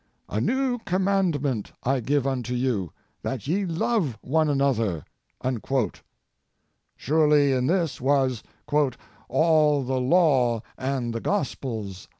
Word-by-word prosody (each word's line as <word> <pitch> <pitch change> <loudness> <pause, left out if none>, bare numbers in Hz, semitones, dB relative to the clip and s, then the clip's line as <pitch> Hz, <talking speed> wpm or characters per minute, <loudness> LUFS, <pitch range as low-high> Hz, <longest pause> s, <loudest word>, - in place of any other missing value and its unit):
"A 105 - -1
new 255 - 0
command 190 -6 0
ment 125 -7 -2
I 135 +1 +1
give 140 +3 0
unto 125 -2 -2
you; 120 - -1 0.3
that 130 -5 -4
ye 195 +6 +1
love 165 - 0
one 155 +3 +2
another." 115 - 0 1.9
Surely 150 -1 +3
in 130 -1 +1
this 170 -3 0
was 130 -3 +2 0.3
''all 150 +1 +1
the 130 0 -1
law 130 -6 +3
and 130 -3 -2
the 115 - -3
gospels." 115 - -3
135 Hz, 115 wpm, -25 LUFS, 125-160 Hz, 1.9 s, Surely